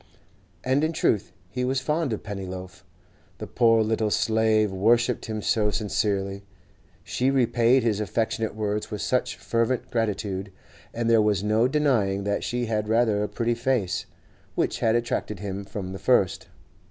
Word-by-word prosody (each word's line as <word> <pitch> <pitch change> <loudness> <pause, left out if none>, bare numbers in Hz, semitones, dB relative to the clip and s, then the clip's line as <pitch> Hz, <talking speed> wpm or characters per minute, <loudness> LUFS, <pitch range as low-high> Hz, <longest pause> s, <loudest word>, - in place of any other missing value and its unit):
And 130 +3 +1
in 160 +1 +1
truth 110 - +1 0.2
he 125 +7 -3
was 130 +1 +1
fond 150 +1 -1
of 110 - -3
Pennyloaf. 95 -3 -7 0.5
The - - -6
poor 115 -2 +3
little 110 0 0
slave 110 -1 +2
worshipped 115 +7 +2
him 110 -2 -4
so 105 -2 +2
sincerely; 100 -2 -1 0.6
she 130 +2 0
repaid 125 -1 +3
his 110 -3 +1
affectionate 110 +1 -1
words 105 -1 -2
with 105 - -4
such 125 - 0
fervent 120 +2 -1
gratitude; 100 -4 -2 0.4
and 115 0 -2
there 115 -1 +5
was 105 -2 +1
no 110 +3 +3
denying 120 -9 +1
that 100 0 -1
she 120 0 -1
had 105 -2 -1
rather 110 -2 +2
a 105 - -1
pretty 120 0 0
face, 120 -5 -1 0.5
which - - 0
had 115 0 +2
attracted 120 -3 -1
him 100 +1 -5
from 95 -1 -6
the 95 - -7
first. 100 -4 +2
110 Hz, 155 wpm, -25 LUFS, 100-120 Hz, 0.6 s, there